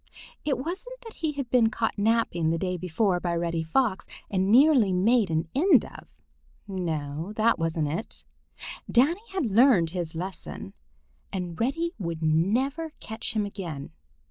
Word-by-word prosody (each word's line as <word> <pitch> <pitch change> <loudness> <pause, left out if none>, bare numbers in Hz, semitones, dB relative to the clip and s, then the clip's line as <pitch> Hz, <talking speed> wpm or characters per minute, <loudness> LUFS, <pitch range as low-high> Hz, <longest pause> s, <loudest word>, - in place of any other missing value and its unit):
It 290 -3 0
wasn't 380 - -6
that 455 -1 -11
he 315 -2 -1
had 275 -4 -5
been 235 -3 +4
caught 225 -1 -1
napping 205 -6 +1
the 165 - +1
day 180 +1 -2
before 180 +2 0
by 175 -1 -1
Reddy 170 -1 -1
Fox 190 +5 0 0.2
and 190 0 +1
nearly 255 -5 +6
made 205 +3 +3
an 160 0 0
end 355 +8 +4
of. - - -12 0.6
No, 165 -2 -3
it 225 -3 +3
wasn't 165 -1 0
that. 165 +9 -5 0.7
Danny 295 - +3
had 380 -6 -1
learned 215 - +4
his 170 -3 -4
lesson, 175 - -6 0.6
and 180 -3 -5
Reddy 330 +8 0
would 170 -3 -4
never 245 - +1
catch 220 +2 -5
him 210 -1 +1
again. 170 -9 -6
200 Hz, 150 wpm, -26 LUFS, 170-255 Hz, 0.7 s, nearly